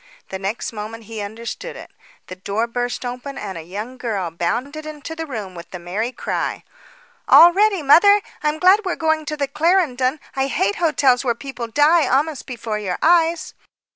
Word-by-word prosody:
The 190 - -5
next 200 +4 -4
moment 220 +2 -7
he 220 0 -7
understood 230 - -6
it. - - -11 0.3
The 185 - -8
door 200 +4 -2
burst 245 +1 -3
open, 250 +3 -6
and 200 -2 -6
a 165 - -6
young 210 +10 -7
girl 200 -8 -2
bounded 245 - -3
into 310 +1 -8
the 325 0 -5
room, 215 -8 -6
with 170 -1 -10
the 180 - -7
merry 190 +8 -3
cry: - - -3 0.6
"All 345 +1 +8
ready, 400 -3 +2
mother. 405 +8 +6 0.2
I'm 300 -1 0
glad 370 +5 +6
we 370 -3 -1
are - - -4
going 315 -1 0
to 305 0 -4
the 280 -1 -1
Clarendon. 300 -3 +1 0.2
I 270 0 0
hate 375 +8 0
hotels 275 -6 +2
where 240 -3 0
people 250 -2 -6
die 295 +5 +4
almost 285 +2 0
before 225 -4 -4
your 190 -4 -3
eyes." 335 0 +3
260 Hz, 185 wpm, -20 LUFS, 220-315 Hz, 0.6 s, All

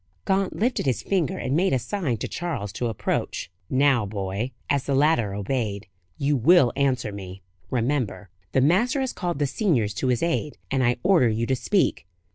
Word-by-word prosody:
Gaunt 195 0 +1
lifted 240 - 0
his 130 - 0
finger, 180 -8 0
and 130 - -1
made 185 +1 +2
a - - +4
sign 145 - -2
to - - -4
Charles 130 - -4
to 120 +2 -2
approach. 110 -5 -2 0.2
"Now, 135 -3 +3
boy" 100 +3 -3 0.2
as 140 -2 0
the 140 - 0
latter 135 -9 +2
obeyed 105 -1 -2 0.3
"you 145 +1 +1
will 135 0 +5
answer 130 -6 0
me, 95 -2 -9 0.3
remember. 115 -7 -1 0.2
The 130 - +3
master 215 - +3
has 260 - -2
called 175 -4 -3
the 145 - +1
seniors 135 - +1
to 130 - -2
his 125 +1 +1
aid, 165 -3 -1
and 135 -1 +2
I 120 0 +2
order 175 -10 +4
you 110 +1 0
to 130 - +1
speak. 185 - 0
130 Hz, 185 wpm, -25 LUFS, 110-165 Hz, 0.3 s, will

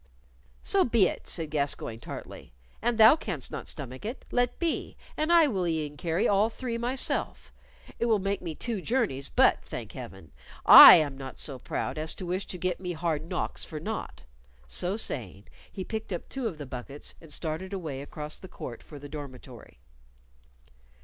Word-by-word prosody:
"So 390 -1 +4
be 230 -5 +4
it," - - -6
said 160 -4 -2
Gascoyne, 140 -6 -1
tartly. - - -9 0.3
"An 240 +1 +1
thou 225 +5 +8
canst 185 - -5
not - - -6
stomach 130 -3 -6
it, 230 +5 -6
let 245 0 +1
be, 335 -2 -2 0.2
and 310 +2 0
I 340 -2 +7
will 190 -10 0
e'en 155 -3 -2
carry 165 +5 0
all 205 +2 +3
three 235 0 -5
myself. 250 +3 -2 0.5
It 235 - +1
will 225 -2 +4
make 195 0 -2
me 165 -3 -5
two 225 0 -3
journeys, 205 - 0
but, - - +4
thank - - -7
Heaven, 85 -4 -10 0.3
I - - +13
am 145 -4 +1
not 135 -1 -8
so 135 -3 -3
proud 155 - -3
as 155 0 -3
to 185 - -6
wish 185 +3 -2
to 180 - -5
get 180 0 -1
me 180 -1 -4
hard 160 -1 -2
knocks - - -3
for 155 - -6
naught." 215 +8 -5 0.4
So 175 - -1
saying, 100 - -5 0.2
he 190 - -5
picked 220 +1 -5
up 175 - -4
two 265 -3 -3
of 180 -8 -5
the 145 - -7
buckets 130 +3 -7
and 165 -2 -13
started 160 +5 -4
away 160 -9 -4
across 150 +1 -5
the 185 - -10
court 120 -9 -8
for 150 - -12
the 145 +1 -9
dormitory. 135 - -10
170 Hz, 185 wpm, -28 LUFS, 145-220 Hz, 0.5 s, I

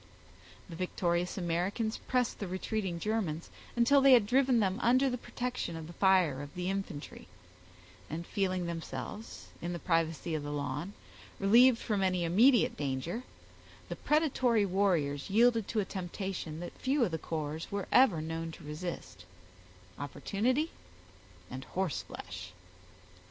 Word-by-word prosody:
The 170 - -8
victorious 175 0 -1
Americans 185 +6 -1
pressed 250 -2 +1
the 200 - -3
retreating 185 -1 -2
Germans 190 -6 -2 0.2
until 250 +4 +5
they 270 -1 +7
had 235 -5 +6
driven 255 +1 +3
them 195 0 +1
under 255 +3 +4
the 250 - -1
protection 245 -10 -4
of 165 -1 -6
the 170 - -10
fire 180 -8 +3
of 145 0 -9
the 180 +1 -1
infantry; 195 -7 -5 0.8
and 165 +3 -4
feeling 185 -2 -1
themselves, 170 +6 -6
in 175 +1 -3
the - - -3
privacy 165 -1 0
of 155 - -1
the 145 0 -5
lawn, 145 +6 -3 0.5
relieved 235 +5 +6
from 210 -3 -1
any 185 -2 +1
immediate 225 +9 +4
danger, 145 - -3 0.7
the - - -3
predatory 260 -8 +2
warriors 175 -8 +1
yielded 230 +1 +4
to 220 - -1
a - - -3
temptation 185 -4 -5
that 175 - -6
few 265 0 +2
of 180 - -3
the 160 - -2
corps 155 0 -4
were 200 -1 -3
ever 205 -12 +5
known 165 +1 -4
to - - -12
resist—opportunity 130 - -4 0.8
and 130 +1 -6
horseflesh. 95 - -4
185 Hz, 140 wpm, -31 LUFS, 160-220 Hz, 0.8 s, they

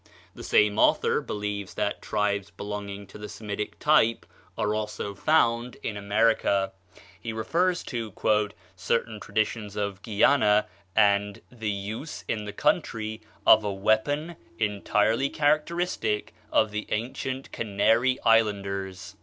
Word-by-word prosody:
The - - -11
same 105 0 +3
author - - +3
believes 105 -1 -4
that - - -1
tribes 100 -1 -1
belonging 100 0 -6
to 100 - -13
the 105 - -7
Semitic 105 -1 -5
type 150 -7 +3 0.3
are 105 - 0
also 105 -1 -3
found 120 0 +2
in 110 - -3
America. 100 -1 +2 0.5
He 115 - -5
refers 170 +11 0
to 115 -4 -4 0.6
"certain 110 +3 -1
traditions 105 0 -2
of 100 -2 -3
Guiana, 105 -1 +3 0.3
and 100 -1 +3
the 110 -3 -4
use 105 +9 -5
in 105 -2 -2
the 105 - -5
country 110 - -1 0.2
of 110 0 +7
a 105 - -1
weapon 110 - 0 0.2
entirely 110 +4 +1
characteristic 150 -7 0 0.2
of 110 -1 +3
the 105 +1 -4
ancient 130 +4 -3
Canary 115 +4 +2
Islanders." 100 -4 +1
105 Hz, 120 wpm, -27 LUFS, 100-115 Hz, 0.6 s, of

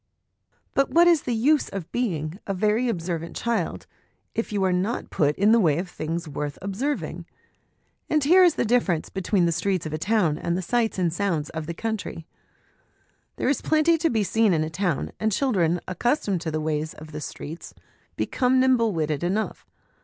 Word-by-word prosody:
But 275 - +2
what 340 +1 +5
is 335 -4 +5
the 245 - -2
use 285 +7 +2
of 195 -5 -6
being 175 -8 -2
' - - -26
a 195 - -1
very 215 +5 +1
observant 170 -4 -3
child/ 230 -8 -2 0.5
if 225 -1 -2
you 200 -2 0
are 190 - +3
70 - - +1
HOME 230 +5 -1
EDUCATION - - -6
not - - -46
put 150 -1 +2
in 205 +3 +3
the 230 - +6
way 160 -8 +3
of 180 +1 -3
things 165 +2 -4
worth 145 0 -4
observing? 230 +10 -3 0.8
And 305 -2 +2
here 360 +6 +6
is 345 -3 +5
the - - 0
difference 215 -8 +1
between 190 -1 +1
the 170 - +2
streets 185 +1 -1
of 155 - -4
a 155 - -2
town 180 -4 +1
and 170 +1 -1
the 185 - -3
sights 230 +3 0
and 175 -3 +1
sounds 170 -6 -1
of 160 -1 -5
the 170 - -4
country. 220 -6 -4 1.1
There - - -2
is 275 -1 +1
plenty 315 +2 +3
to 330 - +2
be 220 -3 +1
seen 215 +1 +2
in 155 -2 +1
a 155 - -4
town, 175 -2 -1
and 220 0 +1
children 185 - +1
accustomed 200 - 0
to 165 - -3
the 155 0 -2
ways 155 0 -2
of 155 0 -11
the 150 0 -6
streets 160 +2 -8 0.4
become 260 0 +1
nimble 250 -4 +3
witted 155 -2 -1
enough. 195 +5 -2
195 Hz, 205 wpm, -25 LUFS, 165-235 Hz, 1.1 s, the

